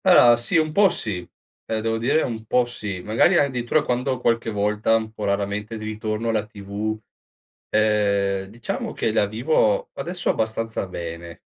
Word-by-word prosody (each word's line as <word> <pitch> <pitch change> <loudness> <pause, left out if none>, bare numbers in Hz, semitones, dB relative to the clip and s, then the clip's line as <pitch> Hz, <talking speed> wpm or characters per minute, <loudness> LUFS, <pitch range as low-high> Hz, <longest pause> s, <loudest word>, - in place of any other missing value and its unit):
Allora 125 -11 +7
sì, 120 +8 +1
po' 200 +4 +5
sì. 105 - -4 0.4
Devo 115 0 -1
dire 130 +7 +2
un 115 -3 -4
po' 125 +2 +2
sì. 105 -6 -5
Magari 115 - +3
addirittura 130 0 +2
quando 125 +1 -1
qualche 115 -2 +1
volta 105 +1 +1
un 110 -1 -1
po' 110 - -7
raramente 100 +2 -2
di 110 - -7
ritorno 110 +1 -3
alla 110 -2 0
TV, 105 +1 -4 0.7
ehm, 100 -2 +2
diciamo 115 +4 -4
che 110 - 0
la 105 - +3
vivo 160 - +1
adesso 175 +1 -3
abbastanza 110 -1 -1
bene. 85 -1 -7
110 Hz, 150 wpm, -23 LUFS, 105-120 Hz, 0.7 s, Allora